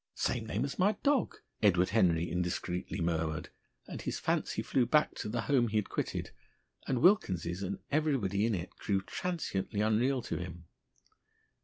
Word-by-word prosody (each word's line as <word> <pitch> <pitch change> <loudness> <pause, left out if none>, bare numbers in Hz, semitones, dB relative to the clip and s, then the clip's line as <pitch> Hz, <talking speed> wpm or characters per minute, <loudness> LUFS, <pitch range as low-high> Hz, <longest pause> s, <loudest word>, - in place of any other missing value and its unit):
"Same 115 -3 -1
name 110 +5 -1
as 140 - -6
my 200 +4 +4
dog," 280 -3 +2 0.2
Edward 95 -4 +4
Henry 85 -6 +3
indiscreetly 90 +1 -2
murmured; 80 -2 -1 0.4
and - - -7
his - - -3
fancy - - -1
flew 125 -3 +1
back 150 -1 +3
to - - -5
the 115 +2 -1
home 125 -2 +2
he 110 0 0
had 105 - 0
quitted, - - -3 0.6
and 130 0 0
Wilkins's 95 - +3
and 100 0 -3
everybody 125 -10 +1
in 115 - +1
it 90 0 -6
grew 100 -2 0
transiently 140 - -3
unreal 120 +4 +2
to - - -3
him. 85 -1 -7
105 Hz, 160 wpm, -32 LUFS, 90-130 Hz, 0.6 s, my